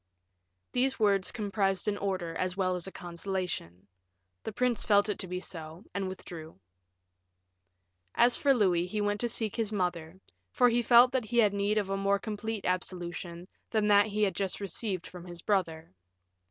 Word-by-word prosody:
These 260 Hz, +2 st, +1 dB
words 200 Hz, -3 st, +2 dB
comprised 200 Hz, -3 st, -1 dB
an 210 Hz, -, +1 dB
order 185 Hz, -4 st, -2 dB
as 185 Hz, +2 st, -2 dB
well 185 Hz, -1 st, +1 dB
as 180 Hz, 0 st, -4 dB
a -, -, -6 dB
consolation; 175 Hz, -, -4 dB, 0.6 s
the -, -, -5 dB
prince 245 Hz, +1 st, 0 dB
felt 205 Hz, 0 st, +4 dB
it 205 Hz, -, -2 dB
to 185 Hz, -, -2 dB
be 180 Hz, +1 st, -3 dB
so, 165 Hz, +1 st, -8 dB
and 195 Hz, -1 st, -2 dB
withdrew. 165 Hz, -, -9 dB, 1.6 s
As 240 Hz, +1 st, +5 dB
for 280 Hz, -, +3 dB
Louis, 185 Hz, -8 st, +3 dB
he 210 Hz, +3 st, -3 dB
went 205 Hz, 0 st, 0 dB
to 240 Hz, -, +1 dB
seek 220 Hz, -2 st, -1 dB
his 225 Hz, -3 st, -1 dB
mother, 180 Hz, -3 st, -2 dB, 0.3 s
for 245 Hz, -1 st, +4 dB
he 240 Hz, +1 st, +2 dB
felt 240 Hz, +1 st, +7 dB
that 255 Hz, -3 st, 0 dB
he 240 Hz, +3 st, -3 dB
had 210 Hz, -4 st, +5 dB
need 200 Hz, +1 st, 0 dB
of 200 Hz, -2 st, 0 dB
a 195 Hz, -, 0 dB
more 200 Hz, 0 st, +2 dB
complete 215 Hz, 0 st, -4 dB
absolution 175 Hz, -1 st, -3 dB, 0.2 s
than 215 Hz, -2 st, +1 dB
that 205 Hz, +1 st, +6 dB
he 215 Hz, 0 st, 0 dB
had 195 Hz, -, +2 dB
just 195 Hz, -2 st, -2 dB
received 195 Hz, -1 st, -2 dB
from 180 Hz, -1 st, -9 dB
his 175 Hz, -1 st, -9 dB
brother. 165 Hz, -, -1 dB
195 Hz, 180 wpm, -30 LUFS, 180-215 Hz, 1.6 s, felt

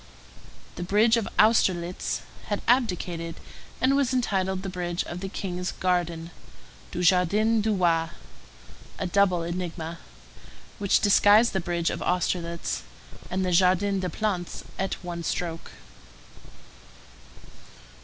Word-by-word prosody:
The -, -, -3 dB
bridge 215 Hz, +5 st, +4 dB
of 230 Hz, -3 st, -1 dB
Austerlitz 185 Hz, -5 st, +2 dB, 0.2 s
had 205 Hz, -, -2 dB
abdicated, 180 Hz, -9 st, 0 dB, 0.4 s
and 260 Hz, +2 st, +3 dB
was 275 Hz, -3 st, +2 dB
entitled 190 Hz, -6 st, 0 dB
the -, -, -4 dB
bridge 175 Hz, -1 st, -2 dB
of 175 Hz, -, -6 dB
the 195 Hz, +1 st, -5 dB
King's 180 Hz, -2 st, -4 dB
Garden 175 Hz, -2 st, -1 dB, 0.6 s
[du -, -, -3 dB
Jardin 200 Hz, +6 st, +3 dB
du 215 Hz, 0 st, +1 dB
Roi], 165 Hz, -3 st, +2 dB, 0.9 s
a -, -, -3 dB
double 185 Hz, -2 st, +2 dB
enigma, 170 Hz, -1 st, -4 dB, 0.8 s
which 200 Hz, -1 st, +3 dB
disguised 210 Hz, +2 st, +5 dB
the 190 Hz, -, +1 dB
bridge 170 Hz, -1 st, -1 dB
of -, -, -5 dB
Austerlitz 170 Hz, -1 st, -1 dB, 0.5 s
and 185 Hz, +1 st, -1 dB
the 180 Hz, -, 0 dB
Jardin 190 Hz, +3 st, +3 dB
des 185 Hz, -1 st, -2 dB
Plantes 185 Hz, -2 st, -3 dB, 0.2 s
at 190 Hz, 0 st, -1 dB
one 175 Hz, -1 st, -5 dB
stroke. 165 Hz, -1 st, -3 dB
180 Hz, 120 wpm, -26 LUFS, 175-205 Hz, 0.9 s, disguised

